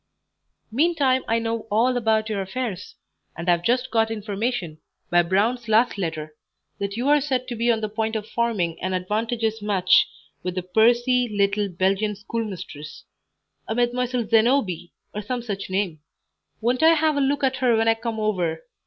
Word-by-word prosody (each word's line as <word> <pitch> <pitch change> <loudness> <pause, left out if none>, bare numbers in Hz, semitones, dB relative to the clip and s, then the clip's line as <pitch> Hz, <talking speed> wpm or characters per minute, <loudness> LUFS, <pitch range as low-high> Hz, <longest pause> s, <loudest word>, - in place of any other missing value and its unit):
"Meantime 275 -1 +2
I 230 - +2
know 230 -1 -3
all 235 +5 +2
about 220 -2 +1
your 210 -3 -2
affairs, 195 -1 -5 0.4
and 170 +2 -6
have 175 -1 +3
just 245 +6 0
got 225 -1 +2
information, 210 -5 -3 0.3
by 175 0 +5
Brown's 215 +7 0
last 220 +3 +3
letter, 155 -5 -4 0.5
that 200 +1 -3
you 245 +3 -1
are 295 0 +5
said 260 -3 -1
to 245 - -4
be 235 +1 +2
on 225 -1 0
the 215 - -1
point 220 +1 -2
of 215 -1 -3
forming 210 -10 -1
an 185 +1 -1
advantageous 220 +4 -1
match 190 -4 +4 0.3
with 180 0 -4
a 185 - -1
pursy, 240 +5 +3
little 200 0 +1
Belgian 195 +4 0
schoolmistress 195 -8 -6 0.6
a 220 - -2
Mdlle. 245 -1 0
Zenobie, 220 - +2 0.2
or 210 - -3
some 240 +3 -4
such 200 -5 -5
name. 185 -4 -1 0.6
Won't 245 +3 +1
I 325 +1 +6
have 310 -1 +2
a 285 - +1
look 280 +1 0
at 265 -1 +2
her 245 -3 +3
when 225 0 +2
I 225 - +6
come 225 0 -4
over! 175 -7 -1
220 Hz, 170 wpm, -23 LUFS, 195-245 Hz, 0.6 s, I